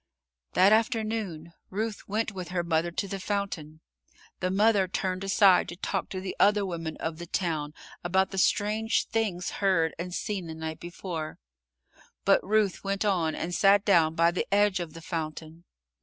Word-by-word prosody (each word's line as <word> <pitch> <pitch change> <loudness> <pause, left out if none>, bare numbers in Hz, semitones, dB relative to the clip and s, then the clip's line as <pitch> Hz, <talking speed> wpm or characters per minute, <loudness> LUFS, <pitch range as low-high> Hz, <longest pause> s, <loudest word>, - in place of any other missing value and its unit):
That 195 +3 +6
afternoon, 215 -7 -1 0.2
Ruth 215 +2 -4
went 220 +2 0
with 185 -3 -6
her 180 -1 -1
mother 165 0 +1
to 185 +4 -3
the 195 0 -4
fountain. 185 -6 -3 0.6
The 185 - 0
mother 200 0 +3
turned 185 0 -2
aside 195 -1 +5
to 175 - -6
talk 190 +1 -3
to 185 - -4
the 185 0 -5
other 205 0 +4
women 165 -3 -4
of 160 0 -4
the 170 - -7
town 155 -4 -2 0.3
about 190 +2 +1
the 195 - -2
strange 215 +4 +1
things 200 -6 -1
heard 175 -5 +2
and 180 +1 -4
seen 190 -1 -3
the 160 - -6
night 160 0 -5
before, 170 -2 -6 0.9
but - - +4
Ruth 205 -2 +1
went 195 +1 -1
on 175 -6 +1
and 175 +2 -4
sat 200 +2 +4
down 165 -5 +4
by 170 0 +4
the 180 - -3
edge 205 -1 +3
of 170 -3 -5
the 165 - -9
fountain. 160 0 -5
185 Hz, 170 wpm, -28 LUFS, 165-200 Hz, 0.9 s, That